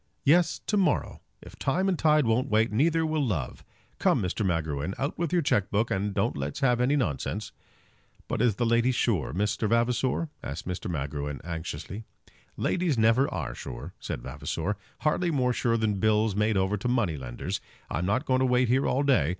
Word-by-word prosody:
"Yes, 165 +3 +4
to 210 - +1
morrow. 190 -2 +1 0.2
If - - -13
time 180 +8 +1
and 190 - +3
tide 150 -2 +4
won't 115 +3 +1
wait, 110 +2 +3
neither 160 +8 +2
will 155 -1 0
love. 85 - -3 0.4
Come, - - +3
Mr. 90 +4 -1
Magruin, 80 -2 -1
out 140 +2 -2
with 170 -3 -1
your 175 -2 +2
cheque 105 -8 +1
book, 110 +3 0
and 100 +2 0
don't - - 0
let's 70 +1 -4
have 125 -3 +3
any 130 +4 +3
nonsense." 105 - -2 0.8
"But - - -1
is 120 -5 +3
the 120 - 0
lady 115 +2 +3
sure, 110 - 0
Mr. 105 +5 0
Vavasor?" 125 +7 +1
asked 75 +6 -6
Mr. 90 0 -4
Magruin, 75 -2 -3
anxiously. 85 +5 -5 0.5
"Ladies 175 -7 0
never 115 +5 +3
are - - -3
sure," 65 0 -8
said - - -5
Vavasor; 105 +2 -3 0.3
"hardly 170 +3 +1
more 130 -5 +1
sure 115 -1 +1
than 105 -3 0
bills 110 -1 +2
made 105 0 +2
over 95 +2 +1
to 100 - -3
money 120 -10 +1
lenders. 60 -4 -5 0.3
I'm 85 +5 -2
not 130 +9 +1
going 130 -2 +2
to 130 - +3
wait 125 -1 +3
here 130 +3 +3
all 135 +3 +1
day. 130 - +3
115 Hz, 190 wpm, -27 LUFS, 90-135 Hz, 0.8 s, Yes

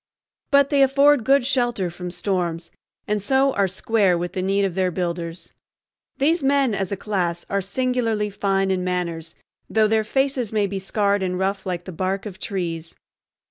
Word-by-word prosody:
But 280 0 +4
they 280 -1 +4
afford 275 0 +5
good 275 +2 +3
shelter 240 -9 0
from 180 +1 -6
storms, 175 -3 -2 0.4
and 210 0 0
so 265 +5 +2
are 200 -1 +2
"square" 195 -1 +1
with 175 +1 -4
the 185 - -2
need 195 +1 +1
of 190 - -2
their 185 0 +1
builders. 170 -1 -4 0.6
These 315 +5 +2
men 275 -3 +2
as 195 -1 -2
a 200 - -2
class 180 -5 -2
are 200 0 +1
singularly 225 0 -1
fine 195 -1 0
in 185 -1 0
manners, 170 -3 -3 0.3
though 220 -1 +3
their 220 0 +2
faces 265 0 0
may 210 -2 +1
be 195 0 -3
scarred 200 +1 0
and 180 -1 -1
rough 195 +1 -2
like 175 -1 -3
the 185 - -7
bark 190 +4 -2
of 190 -3 -8
trees. 170 -5 -4
195 Hz, 180 wpm, -22 LUFS, 180-235 Hz, 0.6 s, afford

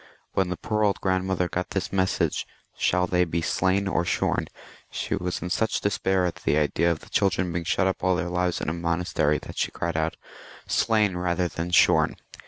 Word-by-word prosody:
When 95 -2 +1
the 90 - -3
poor 105 +4 -1
old 100 -2 +2
grandmother 95 -1 0
got 90 +1 -3
this 95 0 -3
message, 95 -1 0
" - - -42
Shall 90 0 +2
they 90 0 +2
be 85 -1 -2
slain 95 +4 +1
or 90 -2 +1
shorn? 85 - 0 0.2
" - - -20
she - - -3
was 90 0 -3
in 90 - -4
such 110 +3 +1
despair 95 -2 +1
at 85 - -2
the 75 - +1
idea 75 +3 +2
of 85 -2 -1
the - - -15
children 90 -3 +1
being 85 0 -3
shut 90 +3 +1
up 95 -1 -1
all 95 -1 +3
their 90 - -1
lives 90 0 -1
in - - -3
a - - -1
monastery, 85 -3 0
that - - -8
she - - +1
cried 85 -1 -3
out, 80 0 -1 0.3
" - - -17
Slain 105 -4 +2
rather 90 0 0
than 85 0 -4
shorn." 90 -3 +4
90 Hz, 215 wpm, -25 LUFS, 85-95 Hz, 0.3 s, shorn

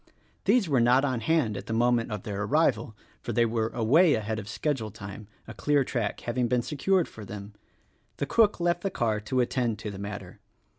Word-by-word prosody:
These 240 -7 +3
were 140 -5 +2
not 125 +4 +4
on 130 -4 -1
hand 120 -3 +1
at 100 - -7
the 110 - -2
moment 120 0 +2
of 105 -2 -4
their 100 -1 -4
arrival; 135 -2 +1 0.3
for 120 - -4
they 115 +2 +3
were 110 -1 0
away 145 +10 +4
ahead 110 0 -2
of 105 0 -8
schedule 130 -4 -2
time 105 0 -9
— - - -35
a 110 - -7
clear 145 +5 +2
track 115 -5 -3
having 120 0 -1
been 125 0 +1
secured 170 +6 +1
for 110 - -11
them. 100 0 -8 0.6
The - - -1
cook 215 +6 +3
left 175 0 +1
the 195 - -1
car 115 - 0
to 125 +5 0
attend 120 -2 0
to 105 - -6
the 95 - -8
matter. 100 -3 -7
120 Hz, 210 wpm, -27 LUFS, 105-140 Hz, 0.6 s, not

